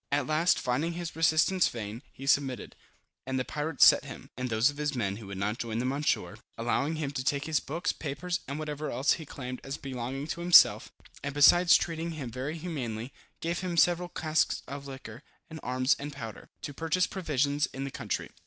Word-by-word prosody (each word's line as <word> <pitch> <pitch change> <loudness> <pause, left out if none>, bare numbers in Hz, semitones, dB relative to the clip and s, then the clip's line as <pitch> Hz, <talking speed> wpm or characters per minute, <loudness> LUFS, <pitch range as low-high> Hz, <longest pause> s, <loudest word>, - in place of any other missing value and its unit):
At 140 -1 +1
last, 155 +5 +3
finding 145 +7 -1
his 170 -1 -5
resistance 165 +3 +3
vain, 110 0 -6
he 135 - -10
submitted, 135 -4 +1 0.5
and 130 0 -1
the 130 - -1
pirates 150 0 +3
set - - +7
him, - - -10
and 125 0 -3
those 115 +5 +3
of 145 - -14
his 150 -1 -1
men 100 -5 -1
who 110 -3 -10
would 100 -1 -6
not 105 +3 -2
join 115 -1 -3
them, 125 +3 0
on 140 - -2
shore, 150 - -1 0.2
allowing 135 +7 0
him 150 -3 -3
to 135 -3 -3
take 140 +1 0
his 155 -2 +1
books, 170 +5 -2
papers, 170 +5 -3
and 140 - -4
whatever 150 -1 -4
else 130 +4 +1
he 160 - -6
claimed 125 -2 -6
as 135 +1 -5
belonging 135 +1 -5
to 170 - -3
himself; 175 0 +6 0.3
and 140 0 -4
besides 170 +4 +7
treating 165 0 -3
him 135 -7 -6
very 135 +7 -4
humanely, 130 -8 -4 0.3
gave 170 +1 -1
him 180 -2 -3
several 175 +1 +3
casks 155 -2 0
of 140 +1 -7
liquor, 130 -3 -9 0.3
with 160 - -7
arms 130 +2 +2
and 145 +1 -6
powder, 115 -6 -8
to 145 - -5
purchase 165 +5 +1
provisions 145 -6 0
in 135 - -6
the 140 - -4
country. - - -4
140 Hz, 205 wpm, -29 LUFS, 125-160 Hz, 0.5 s, set